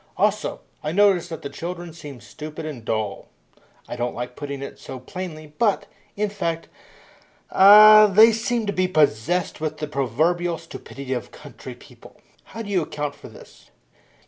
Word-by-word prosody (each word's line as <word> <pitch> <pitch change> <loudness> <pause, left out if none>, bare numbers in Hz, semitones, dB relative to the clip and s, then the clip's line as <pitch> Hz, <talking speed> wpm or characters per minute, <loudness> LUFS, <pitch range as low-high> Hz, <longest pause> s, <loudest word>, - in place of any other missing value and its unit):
Also, - - 0 0.2
I 150 - -2
notice 195 -3 +3
that 165 -2 -8
the 140 - -5
children 175 -1 -7
seem 145 -7 -10
stupid 155 +10 -9
and 140 -7 -7
dull. 110 -3 -3 0.6
I - - -6
don't 120 0 -3
like 125 +1 -6
putting 140 -1 -6
it - - -9
so 130 - -8
plainly, 155 +1 -8
but, 220 -4 +2 0.3
in 210 0 -1
fact, 165 -5 -3 0.8
ah, 215 +2 +9
they 215 +3 +7
seem 230 +1 -1
to 200 - -2
be 185 -1 +1
possessed 155 +1 0
with 155 -1 -3
the 150 - -3
proverbial 155 +6 0
stupidity 135 -3 -8
of 125 -4 -5
country - - -11
people. - - -17 0.3
How 225 - -8
do 205 - -9
you 185 -3 +2
account 150 -2 -4
for - - -13
this?" - - -16
160 Hz, 165 wpm, -23 LUFS, 140-190 Hz, 0.8 s, ah